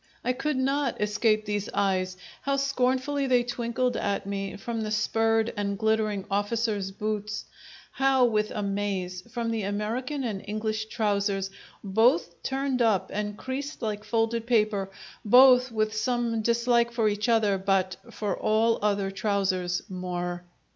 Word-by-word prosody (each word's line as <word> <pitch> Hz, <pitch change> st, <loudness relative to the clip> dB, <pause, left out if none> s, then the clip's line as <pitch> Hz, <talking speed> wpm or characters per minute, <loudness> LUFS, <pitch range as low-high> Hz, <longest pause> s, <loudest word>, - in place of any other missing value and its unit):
I 250 Hz, -, +2 dB
could 285 Hz, +2 st, -1 dB
not 270 Hz, 0 st, 0 dB
escape 215 Hz, +1 st, +1 dB
these 205 Hz, 0 st, -2 dB
eyes; 185 Hz, -2 st, 0 dB, 0.2 s
how 275 Hz, +1 st, 0 dB
scornfully 275 Hz, +1 st, 0 dB
they 250 Hz, -2 st, +4 dB
twinkled 240 Hz, +1 st, -1 dB
at 200 Hz, -1 st, -1 dB
me 195 Hz, 0 st, -4 dB
from 230 Hz, +2 st, -4 dB
the 215 Hz, -, -2 dB
spurred 225 Hz, +1 st, +1 dB
and 200 Hz, -1 st, -2 dB
glittering 215 Hz, -2 st, 0 dB
officers' 205 Hz, -1 st, 0 dB
boots! 210 Hz, +1 st, -3 dB, 0.5 s
How 270 Hz, -2 st, +3 dB
with 215 Hz, -2 st, +1 dB
amaze 195 Hz, -3 st, -2 dB
from 230 Hz, -1 st, -2 dB
the 225 Hz, -1 st, -1 dB
American 225 Hz, +8 st, -2 dB
and 210 Hz, -5 st, -3 dB
English 215 Hz, +1 st, -2 dB
trousers, 200 Hz, -3 st, 0 dB, 0.3 s
both 195 Hz, -4 st, +2 dB
turned 270 Hz, -1 st, -1 dB
up 220 Hz, -5 st, +2 dB
and 210 Hz, 0 st, -3 dB
creased 275 Hz, +2 st, -5 dB
like 210 Hz, -1 st, -2 dB
folded 225 Hz, +1 st, 0 dB
paper, 210 Hz, -4 st, +2 dB, 0.3 s
both 250 Hz, +2 st, +7 dB
with 215 Hz, -1 st, 0 dB
some 235 Hz, 0 st, 0 dB
dislike 235 Hz, +1 st, +2 dB
for 230 Hz, -2 st, +1 dB
each 210 Hz, +3 st, 0 dB
other 210 Hz, -4 st, +3 dB
but 190 Hz, -1 st, +1 dB
for 210 Hz, -5 st, -2 dB
all 225 Hz, +1 st, +2 dB
other 200 Hz, -2 st, +1 dB
trousers 190 Hz, -3 st, 0 dB
more. 180 Hz, -1 st, -4 dB
215 Hz, 140 wpm, -27 LUFS, 200-240 Hz, 0.5 s, both